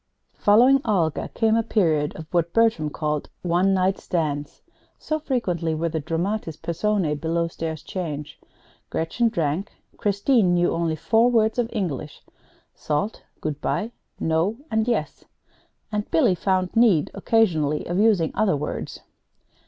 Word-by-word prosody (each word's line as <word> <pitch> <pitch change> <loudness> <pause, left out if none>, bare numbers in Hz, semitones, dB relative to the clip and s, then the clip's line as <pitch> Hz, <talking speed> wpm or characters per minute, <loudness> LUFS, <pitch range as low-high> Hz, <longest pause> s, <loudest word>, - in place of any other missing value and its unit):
Following 250 +6 +5
Olga 175 -8 0
came 225 -1 +3
a 230 - +3
period 160 -10 +1
of 160 - -8
what 170 -1 +1
Bertram 225 -10 +2
called 150 -1 -3
"one 180 +2 +2
night 190 0 +1
stands," 145 -4 -3 0.3
so 310 0 -2
frequently 180 - -1
were 165 +2 -1
the 160 0 -2
dramatis 165 +2 -2
personæ 170 -3 -1
below 165 +1 0
stairs 160 -2 -5
changed. 150 -6 -6 0.5
Gretchen 230 +9 0
drank. 170 -2 -2 0.3
Christine 200 -2 +2
knew 175 0 +2
only 165 -1 0
four 225 +9 +3
words 220 -1 +2
of 235 -1 0
English: 155 - -4 0.5
salt, 150 +8 -2 0.2
good 150 -2 -3
by, 220 +3 -1 0.3
no, 165 +7 0
and 220 +1 +1
yes; 210 -11 -2 0.7
and 210 -1 -2
Billy 165 +3 +3
found 185 +1 0
need 220 -10 +4
occasionally 160 -10 +1
of 175 +2 -1
using 205 -7 +3
other 200 -8 +2
words. 145 - -5
175 Hz, 135 wpm, -24 LUFS, 160-215 Hz, 0.7 s, Following